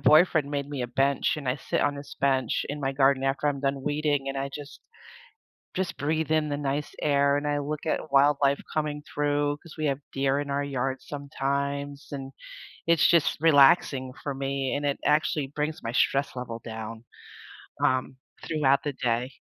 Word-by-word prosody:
boyfriend 155 -2 +5
made 140 -1 -2
me 140 -3 -3
a - - -1
bench 135 +3 +1
and 145 -4 -5
I 125 - +1
sit 135 - -2
on 145 - +1
this 140 0 -9
bench 135 -1 +1
in 145 - -4
my 135 -1 -1
garden 135 0 +3
after 135 +2 0
I'm 140 -1 -1
done 140 0 0
weeding 145 -1 0
and 135 - -3
I 135 0 -2
just 145 -1 -9 0.9
just 185 -2 -2
breathe 155 +2 -1
in 155 -1 +2
the 145 - -1
nice 145 +1 -2
air 140 -1 +3
and 145 +1 -2
I 145 0 +1
look 145 +1 -4
at 155 0 -1
wildlife 140 0 +4
coming 150 -1 -2
through 145 0 0
'cause 165 - -13
we 155 - 0
have 135 -2 0
deer 135 0 +1
in 145 -1 -5
our 140 +1 0
yard 135 -1 -2
sometimes 140 0 -3
and 135 -1 -6 0.5
it's 170 -1 +5
just 170 -3 +3
relaxing 140 -3 +5
for 140 - -3
me 135 0 -2
and 145 - -2
it 140 - 0
actually 150 -1 +2
brings 150 +2 -3
my 115 - -3
stress 140 +2 +1
level 120 -2 -5
down, 110 0 -7 0.8
um, 130 0 +1 0.3
throughout 140 -4 +2
the 145 - -2
day. 125 0 -1
140 Hz, 185 wpm, -27 LUFS, 135-150 Hz, 0.9 s, boyfriend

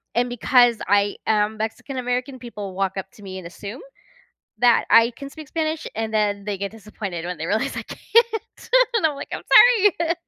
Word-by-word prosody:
and 245 +1 +1
because 245 0 +3
I 205 0 +2
am 215 0 +1
Mexican-American, 250 +3 -4
people 210 -6 -8
walk 190 0 -1
up 190 0 -5
to 205 - -17
me 190 -1 -7
and 180 - -9
assume 200 - -8 0.8
that 240 -1 +4
I 230 +1 +6
can 275 - -9
speak 310 -2 -11
Spanish, 315 0 -3
and 220 0 -3
then 205 -2 0
they 205 -2 -3
get 200 0 -4
disappointed 205 -5 -7
when 180 -1 -5
they 160 - -3
realize 220 - -1
I - - -4
can't, 465 -1 -1 0.3
and 405 - +2
I'm 300 - +1
like, 280 - -8
"I'm - - -4 0.6
sorry." 335 0 0
220 Hz, 185 wpm, -22 LUFS, 200-255 Hz, 0.8 s, I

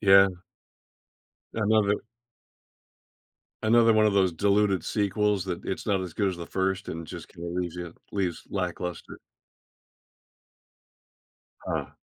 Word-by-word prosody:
Yeah. 95 -1 +7 1.3
Another 105 -1 +2 1.6
Another 115 +1 +5
one 110 0 +5
of 105 - +4
those 95 -2 +3
diluted 100 +1 +2
sequels 105 -2 +1
that, 90 -3 -4
it's 95 - -4
not 100 -3 +2
as 90 -3 -6
good 100 +3 +1
as 95 - -3
the 85 -1 -7
1st 95 +1 -1
and 80 0 -5
just - - -8
kinda 85 +1 -8
leaves 90 0 -3
ya 90 -1 -5 0.2
leaves 95 -4 -1
lackluster. 90 -2 -4 2.4
Huh. - - -4
95 Hz, 120 wpm, -27 LUFS, 90-105 Hz, 2.4 s, Yeah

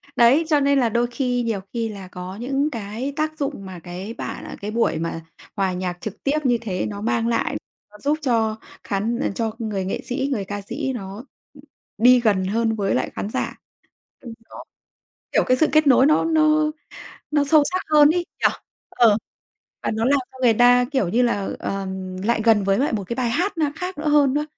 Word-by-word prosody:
Đấy, 260 +7 +5
cho 300 -2 +3
nên 280 0 +3
là 240 -3 +2
đôi 235 +2 +1
khi 245 0 -1
nhiều 225 -3 -1
khi 230 -2 -1
là 200 -3 -8
có 180 +1 -8
những 270 +6 -1
cái 230 +4 -4
tác 310 0 -2
dụng 275 -8 -3
mà 185 -2 -8
cái 180 +6 -7
bạn - - -6
cái 210 - -4
buổi 230 -7 +1
mà 165 0 -3 0.3
hòa 195 -2 0
nhạc 180 -1 -3
trực 210 0 -7
tiếp 290 +2 +1
như 245 -2 +3
thế 185 -5 -2
nó 205 -1 -6
mang 230 +1 0
lại, 235 -1 0 0.4
nó 210 - -14
giúp 295 +5 0
cho 225 -5 +1 0.3
khán 220 +5 -1 0.2
cho 225 -2 -1
người 210 -4 -3
nghệ 190 - -3
sĩ, 265 +2 -2
người 210 -6 -1
ca 205 +1 -5
sĩ 265 +7 -3
nó 200 0 -7 0.7
đi 250 +3 +6
gần 205 -5 +2
hơn 225 +3 0
với 200 -2 0
lại 130 - 0
khán 200 - -3
giả. - - -3 0.7
Ừ, 235 -3 -9 0.2
đó, - - -10 0.7
kiểu, - - +4
cái 255 - +3
sự 310 - +4
kết 310 -1 +4
nối 260 0 +6
nó 310 - +3
nó 310 -1 +3 0.6
nó 295 -1 +2
sâu 295 +1 +5
sắc 370 - -1
hơn 300 -1 +7
ý, 345 +1 0 0.2
nhở? - - +5 0.4
Ờ. 225 -4 +4 0.7
Và - - -1
nó 225 0 -1
làm 280 +3 +4
cho 260 - -14
người 235 -3 +5
ta, 245 +2 +5
kiểu 260 -10 +1
như 235 +8 +2
là, 205 -5 0
ờ, 195 -1 -3 0.4
lại 235 0 +1
gần 220 -3 +4
với 195 +1 +2
lại 285 +1 +1
một 205 -3 -2
cái - - -2
bài 245 -2 0
hát 355 - -1
na 295 -3 +1
khác 365 +1 -5
nữa 305 +1 -1
hơn 290 -3 +4
á. 295 +1 +1
235 Hz, 210 wpm, -22 LUFS, 205-280 Hz, 0.7 s, hơn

